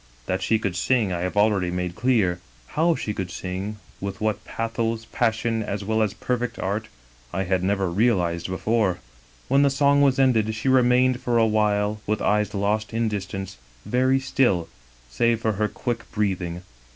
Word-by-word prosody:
That 95 Hz, -, -1 dB
she 110 Hz, -, +2 dB
could 100 Hz, -4 st, -3 dB
sing 105 Hz, +1 st, +1 dB
I 85 Hz, -, -2 dB
have 90 Hz, +3 st, -3 dB
already 105 Hz, -4 st, +3 dB
made 90 Hz, 0 st, -2 dB
clear: 105 Hz, -7 st, +1 dB, 0.3 s
how 165 Hz, +2 st, +2 dB
she 105 Hz, -, -3 dB
could 95 Hz, -3 st, -4 dB
sing, 95 Hz, +4 st, -4 dB, 0.2 s
with 100 Hz, -1 st, -5 dB
what 110 Hz, -1 st, -1 dB
pathos, 115 Hz, 0 st, -2 dB
passion, 115 Hz, -1 st, 0 dB
as 100 Hz, -1 st, -3 dB
well 110 Hz, +1 st, +1 dB
as 105 Hz, -1 st, 0 dB
perfect 125 Hz, 0 st, -2 dB
art, 105 Hz, +4 st, -2 dB, 0.4 s
I 95 Hz, +2 st, -1 dB
had 95 Hz, 0 st, 0 dB
never 95 Hz, 0 st, +1 dB
reaUzed 90 Hz, -3 st, +1 dB
before. 95 Hz, 0 st, 0 dB, 0.5 s
"When 135 Hz, +2 st, +4 dB
the 140 Hz, -, +5 dB
song 140 Hz, +1 st, +3 dB
was 135 Hz, -2 st, +4 dB
ended 110 Hz, -5 st, +3 dB
she 115 Hz, +5 st, -4 dB
remained 125 Hz, 0 st, +4 dB
for 120 Hz, -1 st, +1 dB
a 115 Hz, -, +5 dB
while, 105 Hz, -1 st, +1 dB
with 110 Hz, 0 st, 0 dB
eyes 105 Hz, 0 st, +1 dB
lost 105 Hz, +3 st, -1 dB
in 115 Hz, -1 st, +1 dB
distance, 95 Hz, -, -5 dB, 0.3 s
very 130 Hz, +2 st, +2 dB
still, 120 Hz, -10 st, +1 dB, 0.4 s
save 115 Hz, -, +1 dB
for 115 Hz, -1 st, 0 dB
her 105 Hz, +1 st, 0 dB
quick 115 Hz, +2 st, -4 dB
breathing. 95 Hz, -5 st, -2 dB
110 Hz, 175 wpm, -24 LUFS, 95-120 Hz, 0.5 s, the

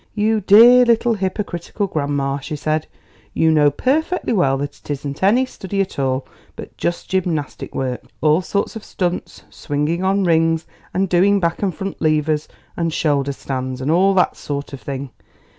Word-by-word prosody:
"You 215 Hz, 0 st, +1 dB
dear 235 Hz, +6 st, +8 dB
little 235 Hz, 0 st, +3 dB
hypocritical 195 Hz, -1 st, -3 dB
grandma!" 140 Hz, -5 st, -1 dB
she 150 Hz, +3 st, -6 dB
said; 155 Hz, +1 st, -1 dB, 0.5 s
"you 160 Hz, 0 st, +3 dB
know 150 Hz, -2 st, +5 dB
perfectly 290 Hz, -, 0 dB
well 135 Hz, -10 st, +2 dB
that 145 Hz, +1 st, -5 dB
it -, -, -19 dB
isn't 140 Hz, 0 st, -4 dB
any 225 Hz, +7 st, +4 dB
study 200 Hz, -5 st, -5 dB
at 195 Hz, -6 st, -2 dB
all, 130 Hz, 0 st, 0 dB, 0.3 s
but -, -, -10 dB
just 170 Hz, -, -3 dB
gymnastic 175 Hz, -6 st, -2 dB
work 130 Hz, -2 st, -2 dB, 0.2 s
all 155 Hz, +3 st, +3 dB
sorts 200 Hz, +4 st, -2 dB
of 220 Hz, -, -7 dB
stunts, 180 Hz, -1 st, -4 dB
swinging 150 Hz, +4 st, -2 dB
on 195 Hz, +1 st, +2 dB
rings 165 Hz, -1 st, +2 dB, 0.3 s
and 190 Hz, +1 st, 0 dB
doing 190 Hz, +3 st, +3 dB
back 170 Hz, -2 st, -1 dB
and 190 Hz, -5 st, -1 dB
front 195 Hz, +3 st, -6 dB
levers 155 Hz, -1 st, +1 dB, 0.3 s
and 165 Hz, -1 st, -1 dB
shoulder 145 Hz, -3 st, 0 dB
stands 130 Hz, -2 st, -4 dB
and 135 Hz, +4 st, -1 dB
all 190 Hz, +3 st, +4 dB
that 180 Hz, -, +2 dB
sort 145 Hz, 0 st, -5 dB
of 135 Hz, -, -8 dB
thing. 135 Hz, -1 st, -5 dB
165 Hz, 170 wpm, -20 LUFS, 145-195 Hz, 0.5 s, dear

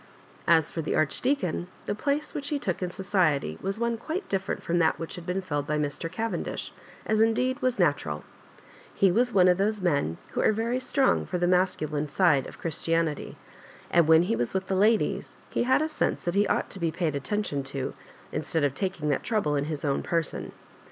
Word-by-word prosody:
As 160 Hz, -2 st, +4 dB
for 165 Hz, -, -3 dB
the 155 Hz, -, -1 dB
Archdbacon, 180 Hz, -, 0 dB, 0.2 s
the -, -, -1 dB
place 285 Hz, +7 st, -1 dB
which 285 Hz, 0 st, -4 dB
he 295 Hz, -, 0 dB
took 190 Hz, -11 st, -2 dB
in 180 Hz, -, -1 dB
society 175 Hz, -, 0 dB
was 195 Hz, +3 st, -2 dB
one 235 Hz, 0 st, 0 dB
quite 320 Hz, -, -4 dB
different 190 Hz, -1 st, -2 dB
from 175 Hz, +1 st, +1 dB
tliat 160 Hz, -1 st, +3 dB
which 165 Hz, -, -6 dB
had 175 Hz, -3 st, -8 dB
been 185 Hz, +1 st, -1 dB
filled 145 Hz, -5 st, -2 dB
by 150 Hz, -, 0 dB
Mr. 150 Hz, +2 st, -2 dB
Cavendish, 225 Hz, +4 st, -3 dB, 0.3 s
as, 220 Hz, 0 st, +2 dB
indeed, 250 Hz, +3 st, +2 dB
was 255 Hz, -1 st, +1 dB
natural 145 Hz, -, +1 dB, 0.7 s
He 195 Hz, -2 st, +4 dB
was 245 Hz, +6 st, +2 dB
one 185 Hz, -4 st, +5 dB
of 180 Hz, 0 st, +4 dB
Uiose 205 Hz, 0 st, 0 dB
men 145 Hz, -, +1 dB
who -, -, -1 dB
are -, -, +4 dB
very 230 Hz, +4 st, 0 dB
strong 265 Hz, +1 st, +2 dB
for 180 Hz, -, -2 dB
tho 175 Hz, -, +1 dB
masculine 155 Hz, -5 st, +1 dB
side 150 Hz, -4 st, +3 dB
of -, -, -11 dB
Christianity; 165 Hz, -1 st, -1 dB, 0.5 s
and 170 Hz, -2 st, +4 dB
when 160 Hz, +1 st, +7 dB
he 215 Hz, +6 st, 0 dB
was 120 Hz, -, -2 dB
with 190 Hz, 0 st, 0 dB
the 190 Hz, -, -1 dB
ladies, 215 Hz, +4 st, +2 dB
he -, -, 0 dB
had 260 Hz, +4 st, +3 dB
a -, -, 0 dB
sense 310 Hz, -, -1 dB
that 175 Hz, -, -1 dB
he 200 Hz, +1 st, +3 dB
ought -, -, 0 dB
to 195 Hz, -, -4 dB
be 170 Hz, -2 st, +1 dB
paid 160 Hz, -2 st, -1 dB
atten 205 Hz, +10 st, -1 dB
tion 145 Hz, -8 st, -2 dB
to^ 135 Hz, -1 st, -3 dB, 0.4 s
instead 160 Hz, -2 st, -1 dB
of 140 Hz, -2 st, +2 dB
taking 180 Hz, -2 st, -2 dB
that 145 Hz, -, +1 dB
trouble 210 Hz, -11 st, 0 dB
in 140 Hz, 0 st, 0 dB
his 150 Hz, -1 st, -4 dB
own 140 Hz, -1 st, +1 dB
person. 165 Hz, -2 st, -2 dB
180 Hz, 210 wpm, -27 LUFS, 155-215 Hz, 0.7 s, when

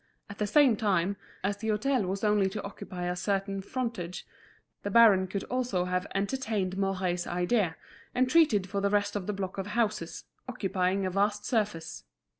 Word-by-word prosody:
At 200 Hz, -, -11 dB
the 210 Hz, -, 0 dB
same 265 Hz, +1 st, +5 dB
time, 200 Hz, -3 st, +1 dB, 0.3 s
as 200 Hz, +1 st, 0 dB
the 220 Hz, -, -5 dB
hôtel 220 Hz, 0 st, +1 dB
was 195 Hz, +2 st, -3 dB
only 210 Hz, -2 st, +3 dB
to 210 Hz, +2 st, -5 dB
occupy 185 Hz, -2 st, -7 dB
a 180 Hz, 0 st, -1 dB
certain, 195 Hz, +1 st, -1 dB
frontage, 230 Hz, -6 st, -4 dB, 0.6 s
the 205 Hz, -, -3 dB
baron 205 Hz, -4 st, +6 dB
could 195 Hz, +1 st, -3 dB
also 245 Hz, -8 st, -1 dB
have 180 Hz, +1 st, -1 dB
entertained 200 Hz, -3 st, -1 dB
Mouret's 185 Hz, -2 st, -1 dB
idea, 180 Hz, 0 st, +1 dB, 0.4 s
and 255 Hz, +1 st, +3 dB
treated 255 Hz, -, +4 dB
for 200 Hz, +1 st, -2 dB
the 200 Hz, -, +2 dB
rest 205 Hz, 0 st, +1 dB
of 200 Hz, -3 st, -3 dB
the 210 Hz, -, -1 dB
block 195 Hz, -1 st, -4 dB
of 195 Hz, -, -3 dB
houses, 210 Hz, -6 st, -1 dB, 0.3 s
occupying 195 Hz, -4 st, 0 dB
a 185 Hz, -, -1 dB
vast 205 Hz, +2 st, 0 dB
surface. 210 Hz, -9 st, -2 dB
200 Hz, 175 wpm, -29 LUFS, 185-215 Hz, 0.6 s, baron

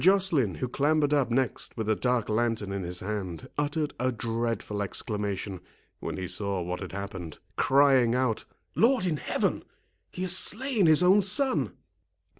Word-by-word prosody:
Joceline, 175 Hz, -, +3 dB
who 80 Hz, -, -3 dB
clambered 145 Hz, +3 st, +1 dB
up 140 Hz, -5 st, +2 dB
next 125 Hz, +1 st, -1 dB
with 110 Hz, -2 st, -3 dB
a 110 Hz, -, +2 dB
dark 125 Hz, -2 st, 0 dB
lantern 110 Hz, -2 st, -1 dB
in 100 Hz, 0 st, -3 dB
his 90 Hz, 0 st, -3 dB
hand, 100 Hz, +2 st, -5 dB
uttered 150 Hz, +1 st, -1 dB
a 130 Hz, +1 st, +1 dB
dreadful 115 Hz, -3 st, -3 dB
exclamation, 100 Hz, -1 st, -3 dB, 0.4 s
when -, -, -5 dB
he 95 Hz, -, -4 dB
saw 95 Hz, +1 st, -1 dB
what 90 Hz, +1 st, -4 dB
had -, -, -7 dB
happened, 95 Hz, -5 st, -6 dB, 0.2 s
crying 135 Hz, -3 st, +4 dB
out, 125 Hz, -4 st, 0 dB, 0.3 s
"Lord 240 Hz, -3 st, +3 dB
in 165 Hz, -4 st, 0 dB
heaven, -, -, -1 dB, 0.5 s
he 185 Hz, -, -5 dB
has 185 Hz, 0 st, +4 dB
slain 225 Hz, -2 st, +2 dB
his 155 Hz, +2 st, +6 dB
own 190 Hz, +3 st, +6 dB
son!" 260 Hz, +8 st, +2 dB
120 Hz, 160 wpm, -27 LUFS, 100-155 Hz, 0.5 s, his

